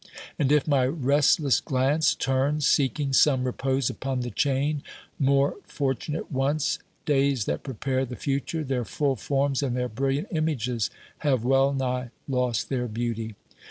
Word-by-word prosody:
And 140 -1 +2
if 150 0 +3
my 135 -4 +3
restless 140 0 +3
glance 145 +2 +2
turns 140 +3 0
seeking 135 0 +1
some 130 -1 +4
repose 130 0 0
upon 130 -1 -2
the 120 0 -4
chain, 140 +5 0 0.4
more 140 0 +2
fortunate 145 +3 -3
once, 140 +2 0 0.3
days 135 -5 +2
that 75 - -2
prepare 130 +1 -2
the 125 -1 -5
future, 140 +5 -2
their 130 -3 -1
full 140 +3 0
forms 140 0 0
and 130 -3 -1
their 125 0 -1
brilliant 135 - -1
images 125 - -1 0.3
have 135 -6 +1
well 135 +1 +4
nigh 125 -2 -2 0.2
lost 125 -4 0
their 125 -2 -1
beauty. 115 -1 -3
135 Hz, 145 wpm, -26 LUFS, 125-145 Hz, 0.4 s, some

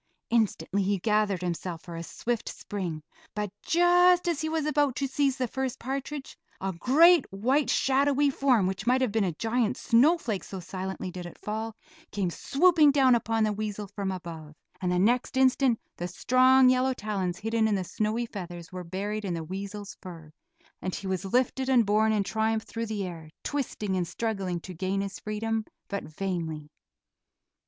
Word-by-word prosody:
Instantly 215 -3 +1
he 200 +1 +1
gathered 205 -1 +1
himself 175 -1 -4
for 170 - -8
a 165 - -5
swift 235 +7 -3
spring, 175 -7 -5 0.3
but 210 -2 -2
just 355 +1 +4
as 335 -3 0
he 315 - -1
was 320 -2 -1
about 290 -3 +2
to 280 - -1
seize 270 0 +1
the 255 -2 0
first 265 +1 -3
partridge, 275 +2 -5 0.2
a 190 0 -2
great, 305 - +5
white 255 +9 +1
shadowy 280 +1 +3
form, 255 -7 +3
which 190 +3 -3
might 255 +1 +4
have 255 -5 +1
been 220 0 +1
a 185 - 0
giant 225 +5 0
snowflake, 240 - +3
so 190 - -7
silently 185 +1 -5
did 180 -1 -7
it - - -12
fall, 220 +1 -4 0.4
came 195 -4 -1
swooping 315 - +4
down 270 -3 +5
upon 225 -1 +1
the 215 -1 +1
weasel 210 0 -4
from 200 -1 -3
above, 165 -4 -8 0.3
and 180 -1 0
the 180 - +1
next 240 +7 +2
instant 260 -2 +3 0.2
the 175 - -3
strong 255 +6 +4
yellow 255 +1 +3
talons 195 -6 -2
hidden 225 0 +1
in 210 - +1
the 190 - -1
snowy 215 +5 -1
feathers 175 -6 -8
were 180 -1 -6
buried 200 +5 -4
in 185 -4 -2
the 165 - -4
weasel's 200 +4 -6
fur, 165 -4 -10 0.5
and 185 - -3
he - - -7
was 190 0 -2
lifted 255 +5 +1
and 245 -4 +5
borne 215 +2 +3
in 210 -2 +2
triumph 220 +1 0
through 230 0 -5
the 210 -3 -3
air, 165 -3 -8
twisting 225 -8 -2
and 180 -2 -1
struggling 195 -2 -2
to 185 +2 -9
gain 190 +3 -1
his 195 -1 -5
freedom, 220 +1 -2 0.3
but 200 - -3
vainly. 160 -3 -4
215 Hz, 180 wpm, -28 LUFS, 185-255 Hz, 0.5 s, great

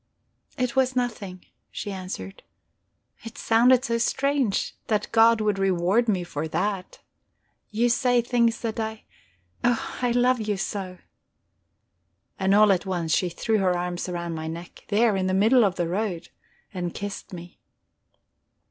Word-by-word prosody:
"It 250 0 -1
was 260 -1 +2
nothing," 210 -7 -3 0.2
she 205 - -6
answered. 185 - -7 0.8
"It 225 0 -9
sounded 245 +3 +4
so 230 -2 0
strange 270 -3 0
that 210 -2 -1
God 230 0 +5
would 210 -2 0
reward 195 +4 +2
me 185 -4 +1
for 160 -2 -4
that. 185 +3 -3 0.7
You 230 +3 +1
say 245 0 +2
things 235 -2 +1
that 225 -1 -3
I... 220 0 -4 0.6
Oh, 240 -1 0
I 245 - +1
love 245 0 +2
you 210 -2 -1
so!" 190 -2 -4 1.4
And 190 +1 +3
all 210 0 +6
at 190 +1 0
once 170 -4 -1
she 180 - 0
threw 220 +5 0
her 185 -2 +2
arms 175 +1 -3
round 170 -1 -4
my 160 0 -5
neck, 170 +2 -8
there 215 0 +3
in 190 -1 0
the 185 - +1
middle 225 +5 +5
of 195 -3 +1
the 175 -2 -1
road, 185 -1 -3 0.4
and 175 -2 -4
kissed 205 -1 -6
me. 175 -1 -10
205 Hz, 150 wpm, -25 LUFS, 180-235 Hz, 1.4 s, all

